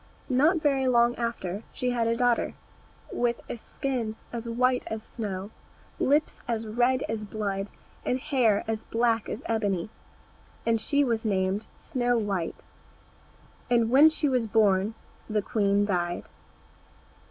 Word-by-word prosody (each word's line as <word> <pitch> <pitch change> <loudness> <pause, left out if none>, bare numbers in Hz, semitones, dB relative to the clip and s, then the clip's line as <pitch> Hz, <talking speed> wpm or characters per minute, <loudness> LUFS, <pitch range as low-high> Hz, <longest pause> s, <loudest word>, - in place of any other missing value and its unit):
Not 310 +6 +3
very 270 -3 +2
long 240 -1 +4
after 215 -5 -3
she 250 0 -1
had 235 -2 +1
a 230 0 +1
daughter, 245 -1 +1 0.6
with 240 -1 0
a - - -4
skin 235 -2 -3 0.2
as 235 0 -4
white 250 +2 +2
as 220 0 -4
snow, 200 -3 -5 0.5
lips 295 +3 +2
as 225 -1 -1
red 245 +4 +2
as 220 -1 -3
blood, 200 -2 -3 0.4
and 250 - 0
hair 250 -8 +2
as 225 0 -2
black 230 -1 +1
as 230 - -5
ebony, 210 -4 -1 0.7
and 225 -1 +2
she 285 +5 +2
was 230 -4 0
named 195 -1 0
Snow 245 -1 0
white. 200 -6 -2 1.1
And 235 -2 +3
when 285 +5 +8
she 310 -1 0
was 250 -4 +1
born 205 -1 +3 0.3
the 210 -1 0
queen 205 -1 +2
died. 175 -3 -1
230 Hz, 140 wpm, -27 LUFS, 210-250 Hz, 1.1 s, when